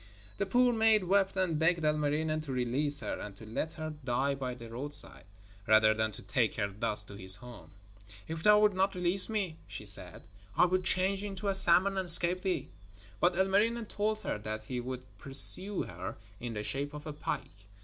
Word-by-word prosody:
The 200 - -3
poor 245 +4 +1
maid 220 -2 +1
wept 195 +1 -1
and 175 -5 -2
begged 165 0 -1
Ilmarinen 155 +1 -3
to 140 - -8
release 130 +3 -2
her - - -7
and 100 -2 -11
to 110 - -14
let 115 +9 -6
her 155 0 -8
die 130 +2 -2
by 130 -2 -7
the 120 -2 -13
roadside, 125 -3 0 0.4
rather 110 0 +3
than 110 0 -4
to - - -14
take 120 -6 -3
her 100 -2 -4
thus 105 +1 0
to 105 - -14
his 95 -1 +8
home. 115 -9 -12 0.6
'If 160 0 -8
thou 210 +4 +3
wilt 210 -1 +1
not 190 +1 -2
release 180 +3 +1
me,' 195 -7 -5
she - - -10
said, - - -5 0.3
'I - - +4
will 185 +1 -2
change 190 +2 -1
into 200 0 -6
a - - -1
salmon 190 +1 +9
and 185 - -6
escape 175 +2 +8
thee.' 190 -1 -5 0.5
But 175 0 0
Ilmarinen 210 +5 -1
told 215 +1 -4
her - - -6
that 110 +1 -8
he 125 +3 -7
would 125 +1 -8 0.2
pursue 185 +8 0
her 90 +2 -10 0.2
in 120 -2 -8
the 105 - -6
shape 140 +5 -5
of 150 - -11
a 150 - -8
pike. 100 -8 -8
155 Hz, 200 wpm, -28 LUFS, 120-190 Hz, 0.6 s, salmon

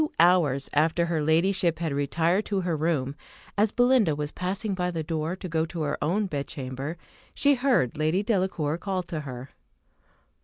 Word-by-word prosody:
Two 305 - -3
hours 165 -6 +4
after 160 +3 +2
her 165 -2 -1
ladyship 170 +2 +2
had 160 -3 -2
retired 165 +7 +1
to 200 -2 -1
her 175 -2 -1
room, 150 -4 0 0.4
as 210 +1 +2
Belinda 245 - +3
was 150 0 -3
passing 195 +3 -2
by 180 -1 -1
the 165 -2 -3
door 160 +2 -2
to 190 - -7
go 160 -2 0
to 165 -1 -4
her 145 - -1
own 190 +8 +1
bedchamber, 140 -1 -4 0.4
she 285 0 +4
heard 245 - +2
Lady 160 +6 +1
Delacour 185 -7 0
call 190 -2 -2
to 170 -2 -5
her. 130 -3 -7
165 Hz, 175 wpm, -26 LUFS, 150-190 Hz, 0.4 s, hours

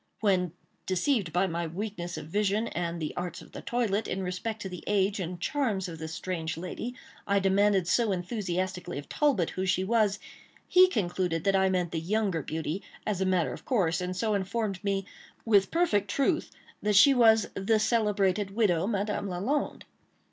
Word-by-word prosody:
When, 185 -5 +2 0.3
deceived 190 - +1
by 180 +4 +2
my 170 -2 -2
weakness 175 -1 -5
of 155 - -6
vision, 205 +6 0
and 170 -1 -3
the 155 -2 -4
arts 175 -1 -4
of - - -14
the - - -8
toilet, 225 -3 0
in 190 +1 -2
respect 185 +5 -3
to - - -4
the 180 -2 -8
age 200 0 +1
and 175 -1 -4
charms 220 -6 -1
of 165 -2 -8
the 160 - -5
strange 160 -1 -4
lady, 185 +8 -5 0.3
I 200 0 +3
demanded 195 -1 +3
so 225 +4 +2
enthusiastically 180 -2 -3
of 145 - -7
Talbot 270 - +1
who 185 - -3
she 185 0 +2
was, 210 -1 +2 0.5
he 370 +1 +7
concluded 180 - -1
that 195 -1 +2
I 190 0 +3
meant 180 -3 0
the 165 - -1
younger 190 0 0
beauty, 160 +5 -3 0.2
as 200 -3 -1
a 190 - +2
matter 175 -8 +1
of - - -10
course, 180 -9 +1
and 180 0 -3
so 215 +2 0
informed 200 0 -2
me, 195 -1 0 0.4
with 200 -4 +4
perfect 265 - +1
truth, 275 - +1 0.3
that 210 0 +1
she 275 +8 +8
was 225 -4 +5
"the 200 +3 +1
celebrated 205 -3 +1
widow, 190 -6 +2
Madame 205 -1 -1
Lalande." 205 +12 -2
195 Hz, 180 wpm, -28 LUFS, 175-215 Hz, 0.5 s, she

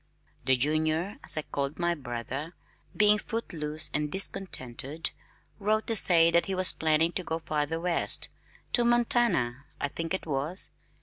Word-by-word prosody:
"The 130 -1 +3
Junior" 155 +7 0
as - - +1
I 155 - -1
called 140 0 -4
my 175 0 0
brother, 135 +3 -6 0.4
being 210 0 +4
footloose 155 -10 -3
and 150 0 -1
discontented, 155 -6 -2 0.5
wrote 215 +2 0
to 225 - +1
say 170 -4 +7
that 170 0 +2
he 195 - -2
was 185 0 +8
planning 160 +1 +1
to 185 - -3
go 160 -1 -3
farther 160 -1 -3
west 175 0 +1 0.5
to 240 - +3
Montana, 235 - +2
I 145 - -2
think 165 +5 -3
it - - -6
was. 150 +5 -3
165 Hz, 150 wpm, -28 LUFS, 150-190 Hz, 0.5 s, was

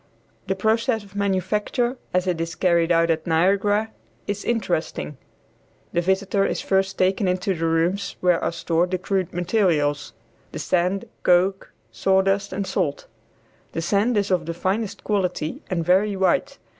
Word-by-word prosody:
The 190 - 0
process 220 +3 +1
of 200 0 -17
manufacture 205 +5 0 0.2
as 180 0 +1
it 175 -3 -1
is 165 +1 -4
carried 170 -2 +2
on 165 0 +4
at 160 0 -2
Niagara 200 +6 +2 0.3
is 205 0 -3
interesting. 175 - -2 0.8
The 175 - +2
visitor 190 +2 +1
is - - -1
first 190 0 0
taken 190 +2 +2
into 185 +1 0
the 165 -1 -1
rooms 170 +5 0
where 180 -2 +2
are - - 0
stored 170 +1 0
the 185 - 0
crude 185 -1 -1
material, 175 -5 +1 0.6
the - - -4
sand, 180 +2 0 0.2
coke, 185 +2 +2 0.2
sawdust 190 - +1
and 200 - -2
salt. 165 -8 -2 0.7
The 165 - -2
sand 210 +6 +2
is 200 -1 0
of 175 -3 +1
the 170 - -3
finest 195 +4 -2
quality 185 -6 -1
and 170 -3 -1
very 195 +4 +3
white. 275 +9 +1
190 Hz, 155 wpm, -23 LUFS, 170-200 Hz, 0.8 s, on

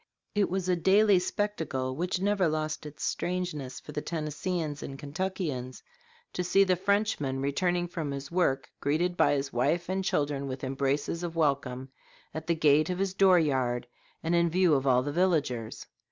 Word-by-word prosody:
It 205 -1 +2
was 185 0 -2
a 180 - +3
daily 195 +3 +4
spectacle, 160 -10 -2
which 180 +4 -1
never 200 -1 +2
lost 155 0 -2
its 150 - -9
strangeness 175 -7 -3
for - - -11
the 150 - -3
Tennesseeans 155 0 -3
and 135 - -6
Kentuckians, 145 -4 -4 0.5
to 180 - -1
see 185 +3 +4
the 185 -2 +2
Frenchman 195 -8 0
returning 175 +6 0
from 165 -4 -4
his 140 +1 -5
work 170 -7 +1
greeted 170 +5 0
by - - +4
his 135 -1 -2
wife 155 +9 +1
and 190 +1 -1
children 145 -5 -1
with 130 0 -6
embraces 140 +4 -1
of 170 -1 -4
welcome 135 -4 0 0.4
"at 160 0 -6
the 170 - +2
gate 155 0 +4
of 180 - -1
his 195 0 -1
door 190 -1 +5
yard, 130 -6 +1 0.4
and 165 +1 0
in 170 0 +3
view 180 -1 +3
of 135 -1 +1
all 125 -1 +4
the 145 - -3
villagers." 145 -10 0
160 Hz, 175 wpm, -29 LUFS, 140-180 Hz, 0.5 s, door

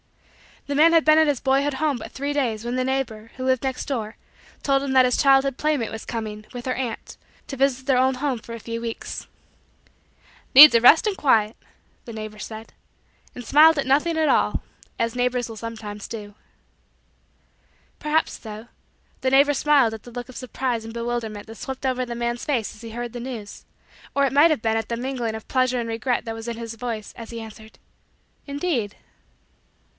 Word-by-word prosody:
The 285 - -3
man 320 +4 +5
had 330 -1 +4
been 310 0 +6
at 315 -1 +5
his 285 -4 +1
boyhood 275 +1 +1
home 295 -1 0
but 220 - -9
three 285 +2 -3
days 235 -7 -1
when 240 +1 -2
the 255 - 0
neighbor, 240 -4 -3
who 255 - -6
lived 260 -1 +1
next 265 -1 -2
door, 225 -5 -4 0.5
told 275 -1 +2
him 275 -1 -2
that 260 -1 +6
his 250 - +1
childhood 270 -1 +4
playmate 300 -7 0
was 220 - -7
coming, 215 -2 -5
with 245 -1 -7
her 255 - +1
aunt, 250 -3 -5 0.3
to 275 - -6
visit 260 -1 +1
their 265 -2 +3
old 260 0 +2
home 270 -3 -1
for 230 - -10
a 230 - -6
few 230 +1 -5
weeks. 230 -1 -6 1.3
"Needs 295 +3 +12
a 230 - +5
rest 305 - +7
and 410 -2 -1
quiet" 220 -6 +2 0.5
the 230 - -8
neighbor 215 -1 -7
said; 220 +2 -8 0.6
and 245 - -7
smiled 310 +5 +6
at 280 - 0
nothing 300 +5 +2
at 315 -1 +2
all - - +2 0.3
as 230 0 -1
neighbors 245 -1 0
will 225 - -7
sometimes 215 -2 -7
do. 210 -3 -8 1.7
Perhaps, 305 +1 0
though, 215 +1 -9 0.5
the 260 - +1
neighbor 280 +2 +5
smiled 280 -5 +3
at 220 - -8
the 240 - -12
look 245 +1 -7
of 255 - -10
surprise 250 -2 -3
and 225 - -8
bewilderment 230 -3 -4
that 225 - -10
swept 265 +3 -6
over 255 -1 0
the 240 -1 -6
man's 235 0 -3
face 245 -8 -1
as - - -15
he 230 -1 -8
heard 240 +1 -5
the 245 - -5
news, 235 -5 -8 0.5
or 280 0 +3
it 265 - -1
might 290 +4 +6
have 300 - 0
been 225 0 +1
at 225 - -3
the 235 - -2
mingling 245 -3 -3
of 220 - -9
pleasure 255 -1 +1
and 230 -1 -3
regret 230 +2 -1
that 225 -1 -4
was 225 +1 -8
in 235 -1 -4
his 230 -1 -6
voice 225 -2 -5
as 230 -1 -9
he 230 -1 -6
answered: 220 0 -12 0.7
"Indeed." 280 - -2
245 Hz, 200 wpm, -23 LUFS, 225-275 Hz, 1.7 s, Needs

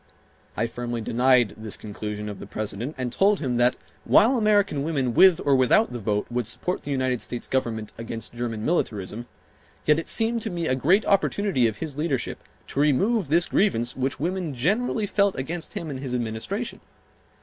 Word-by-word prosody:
I 115 - +1
firmly 120 0 -4
denied 120 -1 +3
this 110 -1 -4
conclusion 105 0 -6
of 105 -1 -6
the - - -9
President 110 +7 -4
and 125 -2 -3
told 200 - +3
him 125 -5 -1
that 125 +1 +3 0.3
while 240 +5 +5
American 205 - +2
women 140 -5 -1
with 185 +5 +6
or 140 -1 +4
without 130 - +3
the 120 - -4
vote 105 -1 -1
would 120 -2 -1
support 180 +9 -2
the - - -8
United 130 -3 0
States 120 - -4
Government 115 -5 -2
against 115 -1 -6
German 115 -2 -4
militarism, 110 - -2 0.6
yet 150 +1 +4
it 165 - -4
seemed 230 +1 +2
to - - -2
me 170 -2 -3
a 130 - +1
great 175 +11 +3
opportunity 200 - +2
of 110 -2 -4
his 150 0 -6
leadership 145 -6 -2 0.3
to - - -3
remove 185 - +2
this 170 +5 +3
grievance 125 - +1
which 130 0 -2
women 170 -2 -2
generally 210 - 0
felt 200 -1 +1
against 165 +6 -4
him 160 -3 -5
and 130 - -5
his 130 -2 -3
administration. 120 - -3
130 Hz, 180 wpm, -25 LUFS, 120-175 Hz, 0.6 s, with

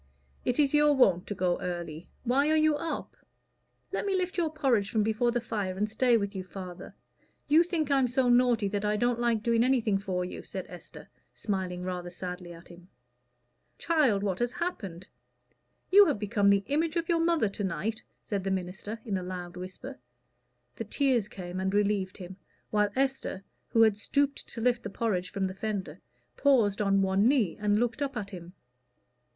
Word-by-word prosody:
"It 250 - 0
is 290 -2 +3
your 295 0 +5
wont 185 -9 +3
to 205 - -4
go 180 -1 0
early. 170 -2 -5 0.2
Why 270 +4 +2
are 315 - +4
you 310 -1 +4
up?" 325 +2 -4 0.8
"Let - - -2
me 395 -1 0
lift 370 0 -1
your 335 -3 0
porridge 260 -10 +1
from 220 -3 +1
before 220 +3 +1
the 240 0 0
fire, 205 -5 -3
and 210 +2 +1
stay 235 +2 +3
with 200 -1 -3
you, 190 - -3
father. 185 -1 -9 0.5
You 310 +3 +6
think 335 -4 -1
I'm 270 -2 +4
so 250 +1 +1
naughty 240 -3 +4
that 205 0 -2
I 210 0 +1
don't 240 +1 +1
like 235 -3 +1
doing 235 -1 +3
anything 235 -6 +2
for 185 -2 -2
you," 180 - -7
said - - -6
Esther, - - -12 0.3
smiling 185 -3 -3
rather 180 -1 -4
sadly 180 0 -7
at 170 0 -13
him. 175 0 -14 0.9
"Child, 275 -12 +2
what 195 -3 -1
has 240 0 0
happened? 195 - -4 0.8
You 405 +1 +8
have 290 - +1
become 205 -1 +2
the 200 0 +4
image 315 +5 0
of 335 -1 -1
your 335 -1 +2
mother 335 -9 +2
to 200 +1 -5
night," 205 +4 -2 0.2
said 200 -3 -3
the 195 - -1
minister, 190 +3 -4
in 200 -4 -1
a - - -6
loud 180 -1 -6
whisper. 185 -6 -8 0.8
The - - -3
tears 240 -1 +1
came 180 -2 -7
and 190 0 0
relieved 205 -2 +1
him 185 -1 -9 0.3
while 210 -1 +2
Esther, 265 -7 -1 0.2
who 225 - +4
had 215 -2 +3
stooped 280 +6 0
to 230 - -7
lift 245 0 +2
the - - -5
porridge 195 -4 -1
from 195 -1 -1
the 185 - -3
fender, 200 -1 -4 0.4
paused 225 -8 +3
on 195 -1 +3
one 190 +3 +3
knee 245 - +2
and 210 0 +2
looked 245 +4 -1
up 275 -3 -2
at 200 -2 -5
him. 175 -2 -9
210 Hz, 190 wpm, -29 LUFS, 190-260 Hz, 0.9 s, You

